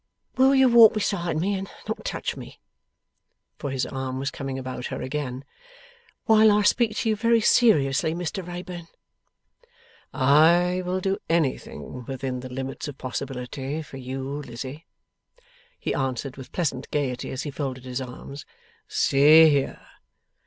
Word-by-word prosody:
'Will 265 +1 +5
you 265 -1 +6
walk 235 -3 +7
beside 175 -6 -1
me, 195 +5 0
and 195 0 -4 0.2
not 220 - -4
touch - - -3
me;' - - -11 1.0
for, 145 - -4
his 130 -1 -1
arm 130 -1 -4
was 135 +1 -2
coming 135 -1 -5
about 130 -1 -5
her - - -5
again; 130 -1 -4 0.8
'while 220 -1 +6
I 205 0 +3
speak 220 +1 +2
to 225 - 0
you 215 - +2
very 230 +2 +3
seriously, 160 - +3
Mr 175 +1 -4
Wrayburn?' 175 -1 -7 1.2
'I 170 +7 +4
will 185 +1 -1
do 195 +1 -1
anything 145 -5 -2
within 130 -1 -4
the 130 +1 -8
limits 130 +3 -5
of 145 -2 -8
possibility, 135 +3 -5
for 140 - -11
you, 130 +1 -5 0.2
Lizzie,' 130 +4 -8 0.9
he - - -3
answered 130 0 -2
with 130 -2 -11
pleasant 135 -7 -2
gaiety 135 -4 -2
as 130 +1 -4
he 145 - -5
folded 130 -3 -5
his 125 +1 -4
arms. 130 +2 -8 0.4
'See 155 +4 +6
here! 140 -2 -1
145 Hz, 145 wpm, -25 LUFS, 130-180 Hz, 1.2 s, walk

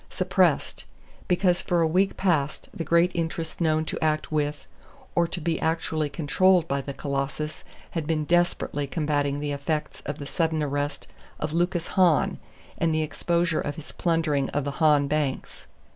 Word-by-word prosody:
Suppressed: - - +1 0.4
because 180 0 +2
for 175 -1 +1
a 165 - +4
week 185 +5 +1
past 155 -7 0
the 165 - -4
great 170 +2 +3
interests 165 0 -3
known 155 -1 +2
to 160 - -4
act 155 0 0
with 150 -1 -1 0.5
or 170 0 +2
to 175 - -4
be 165 0 -1
actually 160 -2 0
controlled 170 +4 +3
by 140 -2 0
the 140 - -6
Colossus 140 +2 -3 0.3
had 160 -3 -3
been 155 -2 0
desperately 175 -4 +1
combating 145 -2 0
the 145 0 -2
effects 145 +2 -3
of 145 - -3
the 145 - -7
sudden 160 +1 0
arrest 145 0 -2 0.3
of 150 0 -3
Lucas 175 0 0
Hahn, 180 -5 +3 0.4
and 165 -1 +2
the 155 - +1
exposure 170 +2 0
of 145 - -3
his 155 -1 -9
plundering 160 -5 0
of 145 - -1
the 140 - -2
Hahn 150 -2 +5
banks. 145 -2 -2
155 Hz, 165 wpm, -26 LUFS, 145-170 Hz, 0.5 s, Hahn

